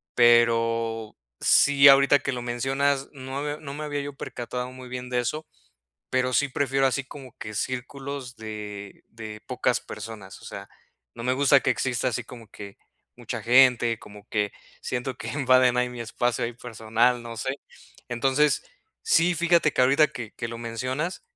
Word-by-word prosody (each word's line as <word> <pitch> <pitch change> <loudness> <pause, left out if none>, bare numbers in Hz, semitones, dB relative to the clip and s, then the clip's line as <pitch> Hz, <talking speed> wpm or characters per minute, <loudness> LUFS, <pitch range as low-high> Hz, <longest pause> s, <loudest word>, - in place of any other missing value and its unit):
Pero 115 -2 +3 0.2
sí, 140 0 +6
ahorita 140 +1 +6
que 140 +1 -2
lo 125 -2 -4
mencionas, 135 +3 0
no 135 0 -6
me 145 0 -3
no 140 -2 -8
me 150 +1 -6
había 145 -1 -3
yo 145 0 -6
percatado 125 -1 -5
muy 130 0 -11
bien 125 0 -6
de 125 -1 0
eso, 150 +6 -3 0.7
pero 130 0 +1
sí 145 - +2
prefiero 135 0 +1
así 135 +1 -1
como 130 -2 -12
que 110 -1 -7
círculos 130 +2 -5
de 105 -2 -8
de 110 -1 -9
pocas - - 0
personas, 105 -4 -9
o - - -13
sea, 100 0 -8 0.5
no 115 - -8
me 125 +2 +1
gusta 140 +1 +5
que 130 - +1
exista 125 +1 0
así 120 -1 -3
como 115 -2 -12
que 100 -1 -10 0.4
mucha - - -5
gente, 120 -2 +5
como 105 0 -14
que 105 -2 -1 0.3
siento 125 0 -3
que - - -7
invaden 130 -3 +3
ahí 125 0 +2
mi 125 -1 -8
espacio, 115 +1 -1
ahí 115 - -3
personal, 120 +1 0
no 115 -1 -8
sé. 130 +4 -2 0.5
Entonces, 135 +5 +2 0.4
sí, 180 - +3
fíjate 170 -2 +3
que - - 0
ahorita 140 +4 +5
que 115 -3 -8
que 115 - -5
lo 115 0 -7
mencionas, 130 +9 -3
125 Hz, 170 wpm, -25 LUFS, 115-140 Hz, 0.7 s, sí